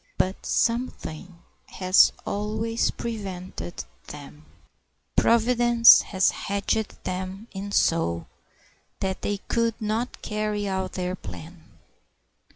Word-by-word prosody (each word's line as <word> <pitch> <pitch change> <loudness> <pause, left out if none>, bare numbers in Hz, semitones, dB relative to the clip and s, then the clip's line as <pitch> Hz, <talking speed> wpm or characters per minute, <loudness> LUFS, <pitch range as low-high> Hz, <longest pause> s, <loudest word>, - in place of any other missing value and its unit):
But 190 +1 -1
something 185 -8 -2 0.2
has 185 0 +4
always 220 +3 -1
prevented 190 -6 -6 0.2
them. 150 +1 -11 0.7
Providence 235 0 +6
has 190 -2 +2
hedged 200 +1 -2
them 190 +4 -5
in 200 +1 -6
so 85 - +1 0.7
that 190 -1 -2
they 205 - -1
could 230 -1 0
not 220 +3 -3
carry 210 -1 -2
out 190 -1 -2
their 180 0 -2
plan. 165 -2 -10
200 Hz, 95 wpm, -25 LUFS, 185-225 Hz, 0.7 s, Providence